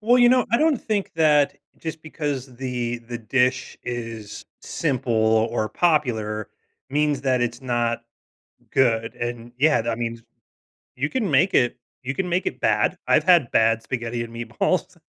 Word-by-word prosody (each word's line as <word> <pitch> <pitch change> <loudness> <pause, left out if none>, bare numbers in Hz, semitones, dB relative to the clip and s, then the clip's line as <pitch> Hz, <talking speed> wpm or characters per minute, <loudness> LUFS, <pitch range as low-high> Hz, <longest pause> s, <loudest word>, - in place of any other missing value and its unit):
Well, 240 +4 +4
you 245 0 +7
know, 255 -1 +4
I 235 - +5
don't 315 -2 +3
think 210 -3 -2
that 150 -3 +3 0.2
just 160 -1 -6
because 145 -5 -4
the 120 -2 -3
the 120 0 -7
dish 125 +2 0
is 115 -3 -6 0.2
simple 130 -6 -2 0.4
or 110 -2 -1
popular 110 - 0 0.4
means 145 -1 +1
that 130 -2 +2
it's 120 0 -2
not 120 -2 -1 0.7
good, 115 -3 +2
and, 120 0 -5
yeah, 150 -1 +4
that 115 0 -2
means 115 -1 -4 0.7
you 145 +4 -1
can 225 -3 -1
make 145 +8 +3
it 120 -1 +3 0.3
you 130 +2 -2
can 190 - -1
make 175 +2 0
it - - -3
bad. - - +2
I've - - +4
had 170 -9 +5
bad 115 0 +3
spaghetti 120 -1 -3
and 115 0 -10
meatballs. 120 0 -1
125 Hz, 160 wpm, -23 LUFS, 115-150 Hz, 0.7 s, you